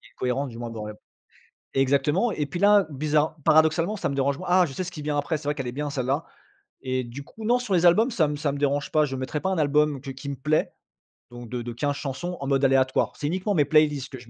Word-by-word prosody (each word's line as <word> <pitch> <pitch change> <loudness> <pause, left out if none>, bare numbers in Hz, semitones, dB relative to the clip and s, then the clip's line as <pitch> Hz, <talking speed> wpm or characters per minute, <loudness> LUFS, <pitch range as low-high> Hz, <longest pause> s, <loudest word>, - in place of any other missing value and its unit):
c'est 115 -2 -20
cohérent, 130 +3 -1
du 120 -4 -9
moins, 120 0 -5
bon 110 -2 -6
re - - -6 0.8
exactement. 140 - +2
Et 150 -5 -2
puis 145 +5 -5
là, 205 0 +6
bizarre 150 +2 0
paradoxalement, 160 +6 +3
ça - - -2
me 140 - -3
dérange 140 0 0
moins 185 - -7
«Ah, 180 0 +5
je 140 - -8
sais 135 - -3
ce 180 - -5
qui 155 -4 -8
vient 150 0 -2
après, 145 +2 -1
c'est 150 - -13
vrai 145 +1 0
qu'elle 135 -4 -4
est - - -4
bien 145 +3 -3
celle-là». 140 +2 -1 0.6
Et 130 -1 -1
du 120 +4 -8
coup, 220 - -12
non, 240 +3 +3
sur 210 -6 -2
les 175 0 +4
albums 220 +9 +5
ça 185 -10 +2
m 150 0 -3
ça 145 0 -1
me 140 - -5
dérange 145 0 0
pas. 155 -1 +4
Je 135 -2 -4
mettrais 130 +3 -3
pas 190 - -1
un 190 - -1
album 150 -1 +2
que 135 +1 -7
qui 135 +1 -8
me 140 - -3
plaît 150 +4 0 0.6
donc 120 -1 -10
de 125 -1 -4
de 120 0 -6
15 145 +4 -1
chansons 150 +6 -5
en 140 - -3
mode 135 0 +2
aléatoire. 130 -1 +2
C'est 145 - -2
uniquement 185 +6 -1
mes 150 -4 +3
playlists 150 -2 +2
que 130 - -7
je 120 -1 -15
145 Hz, 275 wpm, -25 LUFS, 135-160 Hz, 0.8 s, là